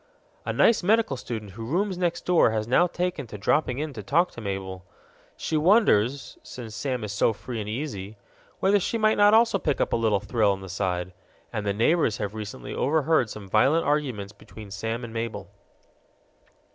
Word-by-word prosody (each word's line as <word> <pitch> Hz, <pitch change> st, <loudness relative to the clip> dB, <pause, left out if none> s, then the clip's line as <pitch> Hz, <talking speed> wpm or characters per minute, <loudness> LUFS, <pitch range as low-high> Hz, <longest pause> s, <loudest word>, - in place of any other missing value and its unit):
A -, -, +1 dB
nice 230 Hz, -, +4 dB
medical 215 Hz, -4 st, +2 dB
student 110 Hz, -5 st, -6 dB
who 115 Hz, +4 st, -8 dB
rooms 185 Hz, -, -1 dB
next 175 Hz, -1 st, -2 dB
door 180 Hz, -8 st, +4 dB
has 110 Hz, -1 st, -2 dB
now 155 Hz, +9 st, +4 dB
taken 175 Hz, -6 st, -3 dB
to 105 Hz, -, -8 dB
dropping 125 Hz, +5 st, +1 dB
in 150 Hz, 0 st, -3 dB
to 110 Hz, -, -7 dB
talk 165 Hz, -, +1 dB
to 120 Hz, -, -9 dB
Mabel. 95 Hz, -2 st, -5 dB, 0.5 s
She 160 Hz, -, -1 dB
wonders 140 Hz, -, +2 dB
since 115 Hz, -4 st, -9 dB
Sam 125 Hz, -1 st, -3 dB
is 105 Hz, -, -4 dB
so 105 Hz, +2 st, +2 dB
free 115 Hz, +2 st, -6 dB
and 105 Hz, 0 st, -5 dB
easy 110 Hz, -5 st, -5 dB, 0.4 s
whether 200 Hz, +2 st, +3 dB
she 230 Hz, -, -1 dB
might 215 Hz, -1 st, +3 dB
not 205 Hz, +1 st, +6 dB
also 225 Hz, -3 st, +4 dB
pick 145 Hz, -5 st, -1 dB
up -, -, 0 dB
a -, -, +4 dB
little 110 Hz, -3 st, +2 dB
thrill 105 Hz, -1 st, +1 dB
on 95 Hz, -, -7 dB
the 95 Hz, -, -9 dB
side. 90 Hz, -1 st, -2 dB, 0.4 s
And 105 Hz, -1 st, -3 dB
the 100 Hz, -, +1 dB
neighbors 115 Hz, -1 st, +2 dB
have 105 Hz, 0 st, -4 dB
recently 110 Hz, +3 st, -7 dB
overheard 155 Hz, -3 st, +2 dB
some 105 Hz, -2 st, -8 dB
violent 135 Hz, -, +3 dB
arguments 130 Hz, -9 st, -1 dB
between 105 Hz, 0 st, -13 dB
Sam 115 Hz, +4 st, -4 dB
and 115 Hz, -1 st, -7 dB
Mabel. 115 Hz, 0 st, -5 dB
120 Hz, 190 wpm, -25 LUFS, 105-160 Hz, 0.5 s, not